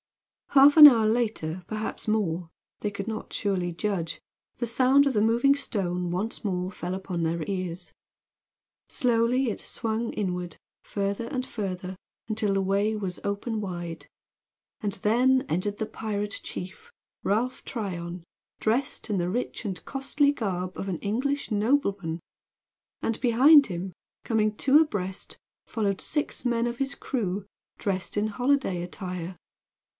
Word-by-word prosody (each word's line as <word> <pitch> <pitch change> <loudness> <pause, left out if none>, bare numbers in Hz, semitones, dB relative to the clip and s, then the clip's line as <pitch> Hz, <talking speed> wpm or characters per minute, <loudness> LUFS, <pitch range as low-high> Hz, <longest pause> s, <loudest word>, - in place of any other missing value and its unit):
Half 280 +1 +7
an 305 - +13
hour 230 -6 +5
later, 215 -7 -1
perhaps 215 0 -4
more 180 -6 0 0.3
they 210 - 0
could 200 0 -5
not 220 -1 -5
surely 185 -4 -1
judge 170 -2 -2 0.4
the 240 - -1
sound 260 +4 +4
of 275 - +2
the 210 - +2
moving 235 +6 +4
stone 180 -9 -2
once 195 +8 -3
more 185 -2 -1
fell 180 0 -4
upon 185 -2 -4
their 165 0 0
ears. 185 -2 -4 1.0
Slowly 245 0 +2
it 210 - -3
swung 230 0 -2
inward 180 -4 -3 0.3
further 200 +3 -2
and 255 +1 -2
further 190 -4 -4 0.3
until 215 -2 0
the 195 - +2
way 200 +3 +1
was 190 -4 -4
open 205 +2 -2
wide. 175 -4 -5 0.7
And 205 -2 -1
then 250 +7 +3
entered 200 +5 -1
the 220 - -1
pirate 210 -2 -3
chief, 190 - -8 0.3
Ralph 235 +6 0
Tryon, 180 -7 -5 0.4
dressed 240 +3 0
in 200 -3 +1
the 175 0 0
rich 240 +5 -3
and 190 -6 -5
costly 280 +1 +1
garb 185 -7 -3
of 195 - -4
an 180 - -1
English 260 - -1
nobleman! 205 - +1 0.8
And 225 - -1
behind 275 +5 +7
him, 180 0 -5 0.3
coming 215 -2 +1
two 280 +2 +5
abreast, 195 -11 -2 0.3
followed 200 -4 -1
six 295 -1 -2
men 235 -1 +1
of 240 0 -3
his 275 0 -1
crew 200 -6 -2 0.3
dressed 190 -1 -2
in 210 +1 +2
holiday 245 -5 +1
attire. 180 0 -5
210 Hz, 140 wpm, -27 LUFS, 185-240 Hz, 1.0 s, an